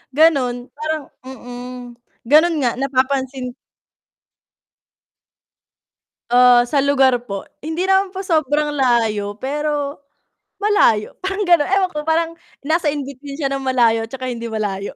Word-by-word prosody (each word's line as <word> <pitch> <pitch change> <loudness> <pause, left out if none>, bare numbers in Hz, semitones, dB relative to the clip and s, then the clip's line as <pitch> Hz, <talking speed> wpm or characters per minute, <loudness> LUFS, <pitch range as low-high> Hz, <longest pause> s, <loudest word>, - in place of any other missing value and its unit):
Ganun, 280 -6 +4 0.2
parang 310 -1 -4 0.2
mm, 245 -1 -8 0.4
ganun 310 +6 +5
nga 245 -3 +2
napapansin 265 -1 -1 2.8
Ah, 245 0 +6
sa 280 0 +2
lugar 270 -3 +3
po. 200 -4 -6 0.2
Hindi 320 +4 -2
naman 385 0 +2
po 380 - -4
sobrang 300 -5 0
layo, 225 -6 +1
pero 290 +1 -2 0.7
malayo 235 - +3
parang 390 +2 -2
gano'n. 345 -5 +4
Ewan 380 -1 +2
ko, 300 - -4
parang 325 +1 +1 0.3
nasa 320 +3 0
in 290 -1 -1
between 275 +1 -9
siya 280 -2 -2
ng 275 - -1
malayo 235 -4 +2
tsaka 255 +1 -5
hindi 235 -1 -5
malayo. 205 -3 -4
275 Hz, 125 wpm, -19 LUFS, 245-310 Hz, 2.8 s, Ah